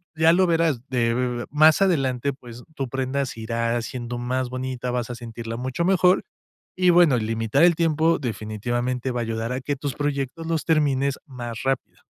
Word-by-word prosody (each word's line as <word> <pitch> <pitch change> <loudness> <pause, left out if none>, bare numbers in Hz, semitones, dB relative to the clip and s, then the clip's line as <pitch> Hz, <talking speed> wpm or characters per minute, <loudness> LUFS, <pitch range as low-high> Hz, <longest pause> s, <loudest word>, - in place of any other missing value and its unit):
Ya 160 +1 +5
lo 185 +1 +4
verás 165 -7 +1
de 120 0 0
más 155 +4 +5
adelante, 140 -7 +1
pues 125 -2 -12
tu 135 -3 -3
prenda 135 +2 -1
se 115 - -8
irá 115 +1 -1
haciendo 120 +1 -5
más 125 +1 -2
bonita. 130 0 -4
Vas 120 -1 -2
a - - -5
sentirla 115 -1 -7
mucho 130 +7 -2
mejor 185 0 +4 0.5
y 185 -1 +4
bueno, 170 -6 +5
limitar 115 +4 0
el 175 -1 +6
tiempo 165 0 +2
definitivamente 120 +2 -3
va 120 - -2
a - - 0
ayudar 115 +1 -3
a 130 - -2
que 140 +2 -3
tus 140 -1 -4
proyectos 145 +2 -3
los 165 -1 -1
termines 140 -3 +2
más 120 -4 -6
rápido. 135 -1 -2
130 Hz, 180 wpm, -24 LUFS, 120-150 Hz, 0.5 s, el